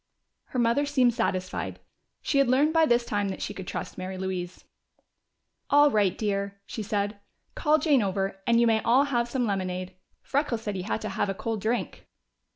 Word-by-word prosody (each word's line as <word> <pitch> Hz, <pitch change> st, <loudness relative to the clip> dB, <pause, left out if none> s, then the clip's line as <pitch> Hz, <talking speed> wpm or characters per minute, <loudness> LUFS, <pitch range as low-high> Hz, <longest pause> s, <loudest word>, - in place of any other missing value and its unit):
Her -, -, -6 dB
mother 240 Hz, +4 st, +2 dB
seemed 255 Hz, -4 st, +3 dB
satisfied. 185 Hz, -6 st, -2 dB, 0.4 s
She 280 Hz, -, +1 dB
had 275 Hz, -, +4 dB
learned 280 Hz, +5 st, +3 dB
by 325 Hz, -1 st, +4 dB
this 240 Hz, -2 st, +3 dB
time 205 Hz, -3 st, -1 dB
that 190 Hz, -, -5 dB
she -, -, -4 dB
could 190 Hz, -2 st, -8 dB
trust -, -, -5 dB
Mary 185 Hz, +1 st, -5 dB
Louise. 185 Hz, -1 st, -4 dB, 1.1 s
"All 290 Hz, 0 st, +6 dB
right, 205 Hz, -5 st, +2 dB
dear," 200 Hz, -1 st, -2 dB
she 220 Hz, -, -6 dB
said. 205 Hz, 0 st, -2 dB, 0.3 s
"Call 305 Hz, 0 st, +3 dB
Jane 295 Hz, -5 st, +3 dB
over, 195 Hz, -1 st, -2 dB
and 235 Hz, 0 st, +4 dB
you 235 Hz, -, +5 dB
may 220 Hz, -1 st, +3 dB
all 250 Hz, +4 st, +4 dB
have 240 Hz, -4 st, 0 dB
some 250 Hz, -1 st, 0 dB
lemonade. 185 Hz, -2 st, -2 dB, 0.3 s
Freckles 265 Hz, -5 st, -1 dB
said 210 Hz, -, -2 dB
he 185 Hz, -, -3 dB
had 210 Hz, +4 st, -2 dB
to 215 Hz, -, -3 dB
have 195 Hz, +1 st, -1 dB
a 195 Hz, -, -2 dB
cold 215 Hz, 0 st, -3 dB
drink." 230 Hz, +4 st, -2 dB
220 Hz, 190 wpm, -27 LUFS, 195-255 Hz, 1.1 s, All